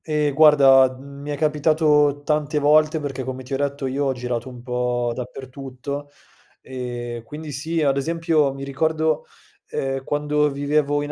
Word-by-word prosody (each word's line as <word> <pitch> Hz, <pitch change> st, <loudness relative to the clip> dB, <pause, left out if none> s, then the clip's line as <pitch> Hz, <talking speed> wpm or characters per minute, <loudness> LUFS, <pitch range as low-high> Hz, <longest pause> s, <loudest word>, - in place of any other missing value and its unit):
Ehm, 150 Hz, -2 st, 0 dB
guarda, 135 Hz, -3 st, +6 dB
uhm, 140 Hz, +1 st, -11 dB
mi 145 Hz, -, -7 dB
è 145 Hz, -, -2 dB
capitato 150 Hz, -1 st, +2 dB
tante 150 Hz, 0 st, 0 dB
volte 155 Hz, +2 st, +4 dB
perché 135 Hz, -3 st, -4 dB
come 130 Hz, 0 st, -5 dB
ti 130 Hz, -, -8 dB
ho -, -, +1 dB
detto 140 Hz, 0 st, -2 dB
io 135 Hz, +2 st, -1 dB
ho 135 Hz, -, +1 dB
girato 125 Hz, 0 st, -4 dB
un 125 Hz, -1 st, -11 dB
po' 125 Hz, -1 st, -1 dB
dappertutto, 135 Hz, +3 st, -7 dB, 0.5 s
ehm, 120 Hz, -2 st, -6 dB
quindi 150 Hz, +6 st, -8 dB
sì, 160 Hz, +4 st, -2 dB
ad 140 Hz, -1 st, +2 dB
esempio 160 Hz, -1 st, +1 dB
mi 135 Hz, 0 st, -8 dB
ricordo, 155 Hz, +3 st, 0 dB, 0.4 s
ehm, 135 Hz, 0 st, -3 dB
quando 150 Hz, +1 st, +1 dB
vivevo 145 Hz, +1 st, 0 dB
in 145 Hz, -, -5 dB
140 Hz, 160 wpm, -22 LUFS, 130-150 Hz, 0.5 s, guarda